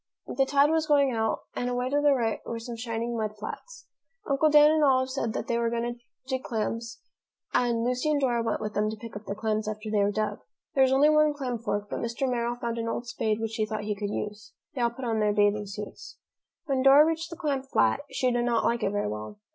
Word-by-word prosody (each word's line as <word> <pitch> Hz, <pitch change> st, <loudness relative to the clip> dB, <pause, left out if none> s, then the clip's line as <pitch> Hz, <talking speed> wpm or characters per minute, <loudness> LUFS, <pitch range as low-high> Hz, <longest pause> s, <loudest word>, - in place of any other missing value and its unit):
The 270 Hz, +1 st, 0 dB
tide 285 Hz, +2 st, +4 dB
was 320 Hz, -1 st, +1 dB
going 285 Hz, -3 st, +4 dB
out, 220 Hz, -2 st, -1 dB
and 245 Hz, -, -1 dB
away 250 Hz, +1 st, -1 dB
to 290 Hz, +1 st, +2 dB
the 290 Hz, -1 st, +4 dB
right 225 Hz, -3 st, 0 dB
were 230 Hz, -, -5 dB
some 230 Hz, +1 st, -6 dB
shining 230 Hz, 0 st, -3 dB
mud 215 Hz, -1 st, -3 dB
flats. -, -, -8 dB, 0.4 s
Uncle 280 Hz, +2 st, +3 dB
Dan 300 Hz, 0 st, +7 dB
and 310 Hz, -1 st, +3 dB
Olive 260 Hz, -2 st, +3 dB
said 230 Hz, -5 st, -2 dB
they 235 Hz, 0 st, -1 dB
were 235 Hz, 0 st, +1 dB
going 235 Hz, +1 st, -2 dB
to 240 Hz, -, -18 dB, 0.3 s
dig 260 Hz, -1 st, -2 dB
clams 230 Hz, +1 st, -3 dB, 0.5 s
and 235 Hz, -2 st, +2 dB
Lucy 250 Hz, +5 st, 0 dB
and 300 Hz, -1 st, +2 dB
Dora 245 Hz, -4 st, +1 dB
went 230 Hz, -, -1 dB
with 210 Hz, -1 st, -4 dB
them 210 Hz, +1 st, +1 dB
to 220 Hz, -, -4 dB
pick 230 Hz, 0 st, -10 dB
up 205 Hz, +1 st, -8 dB
the 200 Hz, -, -4 dB
clams 215 Hz, 0 st, -1 dB
after 215 Hz, 0 st, -4 dB
they 210 Hz, -1 st, +2 dB
were 200 Hz, -, +3 dB
dug. 215 Hz, +1 st, -2 dB, 0.3 s
There 270 Hz, -, +2 dB
was 260 Hz, 0 st, +5 dB
only 285 Hz, +3 st, +5 dB
one 305 Hz, -1 st, +4 dB
clam 250 Hz, -4 st, -3 dB
fork, 205 Hz, -2 st, -2 dB
but -, -, -4 dB
Mr. 235 Hz, +3 st, -2 dB
Merrill 240 Hz, -1 st, -1 dB
found 235 Hz, -1 st, -3 dB
an 230 Hz, -, -2 dB
old 235 Hz, +1 st, -3 dB
spade 220 Hz, -2 st, -1 dB
which 225 Hz, 0 st, -3 dB
he 215 Hz, -, +1 dB
thought 215 Hz, 0 st, -4 dB
he 210 Hz, 0 st, -1 dB
could 205 Hz, 0 st, -4 dB
use. 210 Hz, 0 st, -5 dB, 0.2 s
They 255 Hz, -, -3 dB
all 235 Hz, -, +3 dB
put 245 Hz, +2 st, -8 dB
on 225 Hz, -2 st, 0 dB
their 210 Hz, -1 st, +2 dB
bathing 205 Hz, 0 st, +2 dB
suits. 205 Hz, +1 st, -8 dB, 0.5 s
When 270 Hz, -4 st, 0 dB
Dora 275 Hz, +3 st, +8 dB
reached 325 Hz, +1 st, -1 dB
the 335 Hz, -, -8 dB
clam 290 Hz, -5 st, -1 dB
flat, 270 Hz, 0 st, +2 dB
she 255 Hz, -1 st, 0 dB
did 240 Hz, 0 st, +1 dB
not 240 Hz, -1 st, +1 dB
like 235 Hz, 0 st, +1 dB
it 200 Hz, -, +1 dB
very 205 Hz, 0 st, -1 dB
well. 105 Hz, -, -6 dB
235 Hz, 250 wpm, -27 LUFS, 215-270 Hz, 0.5 s, Dora